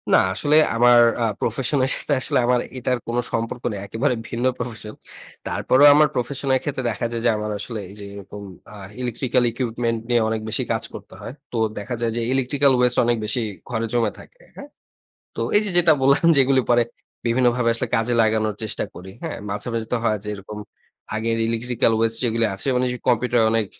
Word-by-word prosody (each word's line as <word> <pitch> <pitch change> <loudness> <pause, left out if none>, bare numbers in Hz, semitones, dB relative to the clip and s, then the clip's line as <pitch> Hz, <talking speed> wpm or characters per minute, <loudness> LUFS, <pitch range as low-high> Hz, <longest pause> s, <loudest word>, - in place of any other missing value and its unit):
না, - - +8 0.2
আসলে 145 +9 +1 0.2
আমার 120 +1 +6 0.2
আ - - +2 0.2
প্রফেশন 130 +5 0
এর 130 - +1
সাথে 150 - -2
আসলে - - -1
আমার 125 0 +3 0.2
এটার 125 0 0
কোনো 120 +1 0
সম্পর্ক 115 +2 -3
নেই। 100 - -5
একেবারে 125 +6 0 0.2
ভিন্ন 120 +1 -2
প্রফেশন। 115 -3 -6 0.5
তারপরেও 140 +3 +4
আমার 150 0 +5
প্রফেশনের 130 +1 0
ক্ষেত্রে 135 -2 -3
দেখা 110 +1 -3
যায় 115 -1 -3
যে, - - +5
আমার 105 0 -3
আসলে 110 +2 -5
এইযে 100 +1 -10
এরকম 100 0 -9 0.3
আ - - -10 0.3
ইলেকট্রিক্যাল 125 +1 0
ইকুইপমেন্ট 115 -1 -2
নিয়ে 120 -1 +3
অনেক 110 -1 -2
বেশি - - -1
কাজ - - -1
করতে - - -11
হয়। 120 - -7 0.2
তো 120 - -3 0.2
দেখা 120 +4 -4
যায় 115 -1 0
যে - - -1
ইলেকট্রিক্যাল 135 +1 +2
ওয়েস্ট 125 -1 +3
অনেক 120 0 +2
বেশি 110 +3 -1 0.3
ঘরে 115 -2 -1
জমে 115 -3 +1
থাকে - - -17
হ্যাঁ? - - -10 0.7
তো - - -3 0.2
এইযে 210 -1 +2
যেটা 170 -2 +6
বললাম 140 +4 +3
যে, - - +3
এগুলো 135 0 +3
পরে 120 0 +5 0.4
বিভিন্নভাবে 120 0 +2
আসলে 115 - -2
কাজে 115 +2 0
লাগানোর 110 -1 +1
চেষ্টা 110 - -2
করি। 95 +2 -10
হ্যাঁ? 165 - -4
মাঝে, 105 +3 -4
মাঝে 115 -1 -2
তো - - +3
হয় 110 -2 +1
যে, - - -6
এরকম 100 +1 -9 0.6
আগের 115 +1 -1
ইলেকট্রিক্যাল 115 0 0
ওয়েস্ট 115 0 +1
যেগুলো 115 -1 +1
আছে 95 - -6
মানে 125 - +2 0.2
কম্পিউটারে 120 0 +2
অনেক 115 -2 +1
120 Hz, 190 wpm, -22 LUFS, 110-125 Hz, 0.7 s, না